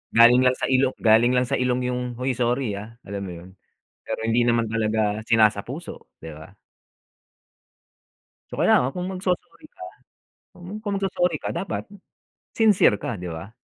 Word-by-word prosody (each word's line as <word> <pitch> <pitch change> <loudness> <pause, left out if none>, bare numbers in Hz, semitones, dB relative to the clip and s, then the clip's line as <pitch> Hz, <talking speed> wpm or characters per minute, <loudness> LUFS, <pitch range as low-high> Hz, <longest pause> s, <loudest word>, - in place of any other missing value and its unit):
Galing 120 +2 +7
lang 130 0 +3
sa - - -3
ilong 130 0 +2
galing 115 +3 +5
lang 125 - +3
sa 120 - -2
ilong 125 0 0
yung, 125 0 -2
"Hoy, 130 +2 -2
sorry 125 0 -1
ah." 110 +3 -11
Alam 100 0 -6
mo 90 - -7
yun? 95 - -14 0.5
Pero - - -4
hindi 120 +1 +2
naman 115 -1 +1
talaga 110 -1 -1
sinasapuso, 115 +7 0
'di 80 -1 -9
ba? 95 +6 -14 1.9
Kaya - - +2
nga 130 +2 -1
kung 180 0 -3
magso-sorry 190 - -4
ka 360 - -14 1.0
kung 205 -2 -2
magso-sorry 185 -2 0
ka - - -5
dapat 195 - -4 0.7
sincere 215 - +4
ka, 105 0 -5
di 90 - -6
ba? 85 +6 -8
120 Hz, 155 wpm, -23 LUFS, 110-130 Hz, 1.9 s, Galing